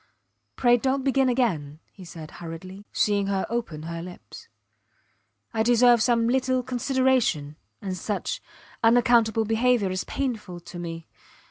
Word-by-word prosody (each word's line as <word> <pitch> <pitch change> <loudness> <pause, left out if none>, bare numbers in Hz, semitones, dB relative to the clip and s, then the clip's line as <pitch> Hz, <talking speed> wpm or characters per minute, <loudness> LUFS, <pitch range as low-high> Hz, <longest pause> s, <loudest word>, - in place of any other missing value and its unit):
Pray, 245 -1 +4
dont 265 +2 0
begin 270 -1 +2
again, 175 - 0
he 190 - -13
said, 165 -3 -10
hurriedly, 185 +4 -8
seeing 205 -1 +1
her 195 -1 0
open 225 -11 -3
her 165 +1 -5
lips. 180 +1 -11 1.1
I 220 - +1
deserve 240 0 +5
some 230 -1 +3
little 255 0 +1
consideration 250 - +1 0.3
and 190 -2 -3
such 205 +4 -3 0.4
unaccountable 230 -1 +4
behaviour 225 -2 +2
is 185 0 -2
painful 220 -10 -3
to 175 +1 -9
me. 165 -1 -6
220 Hz, 130 wpm, -25 LUFS, 180-245 Hz, 1.1 s, deserve